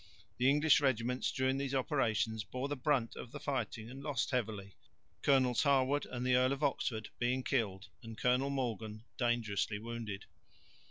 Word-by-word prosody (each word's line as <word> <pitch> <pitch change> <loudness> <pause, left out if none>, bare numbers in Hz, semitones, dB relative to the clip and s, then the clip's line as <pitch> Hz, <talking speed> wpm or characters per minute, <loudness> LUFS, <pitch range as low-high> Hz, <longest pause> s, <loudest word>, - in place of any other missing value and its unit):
The 130 +2 +5
English 150 0 +5
regiments 125 -2 +1
during 130 0 +1
these 140 -1 -2
operations 115 -6 +1
bore 130 +5 -4
the 145 - -2
brunt 130 -3 0
of 120 - -8
the - - -7
fighting 125 -5 -3
and 130 +3 -9
lost 140 -3 -1
heavily, 105 -6 -2 0.5
Colonels 130 -3 +3
Harwood 140 0 +2
and 125 0 -4
the 125 - +3
Earl 130 +1 +4
of 140 +2 -5
Oxford 115 -6 -1
being 125 +2 +1
killed 105 -9 -1
and 115 -2 -9
Colonel 125 +2 +2
Morgan 115 -5 -3
dangerously 115 -4 0
wounded. 110 -3 -6
125 Hz, 160 wpm, -34 LUFS, 115-135 Hz, 0.5 s, The